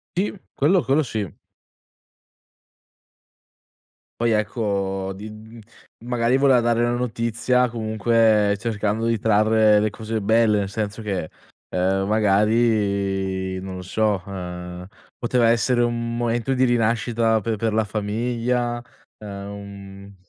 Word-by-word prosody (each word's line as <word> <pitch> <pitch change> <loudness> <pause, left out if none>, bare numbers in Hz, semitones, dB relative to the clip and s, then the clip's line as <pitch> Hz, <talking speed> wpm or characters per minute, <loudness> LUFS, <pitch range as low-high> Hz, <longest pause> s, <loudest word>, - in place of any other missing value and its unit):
Ti, 195 +1 -1
quello 170 +6 +3
quello 140 +4 +2
sì. 110 -6 -4 2.9
Poi 120 - +2
ecco 100 -3 -1
di 105 +2 -8
mhmm, 110 +2 -12 0.5
magari 120 +1 +1
voleva 135 -3 +5
dare 115 0 +1
una 120 - +1
notizia 125 +1 0
comunque 110 -2 +2
cercando 110 0 -1
di 115 -1 +1
trarre 110 0 +4
le 110 - +1
cose 110 +1 -4
belle, 110 0 +3
nel 100 - -2
senso 105 +1 -4
che, 95 -7 -3 0.4
ehm, 95 +2 0
magari 100 -3 +1
non 95 0 -7
lo - - -6
so, 100 0 0
ehm, 90 -2 -7 0.3
poteva 120 -1 +2
essere 120 +1 +2
un 115 0 -2
momento 120 +2 0
di 130 0 +2
rinascita 115 -1 +1
per 115 +1 -1
per 110 +1 -1
la 110 - +2
famiglia. 120 +3 -1 0.4
Ehm, 100 -1 -9
110 Hz, 120 wpm, -22 LUFS, 100-115 Hz, 2.9 s, voleva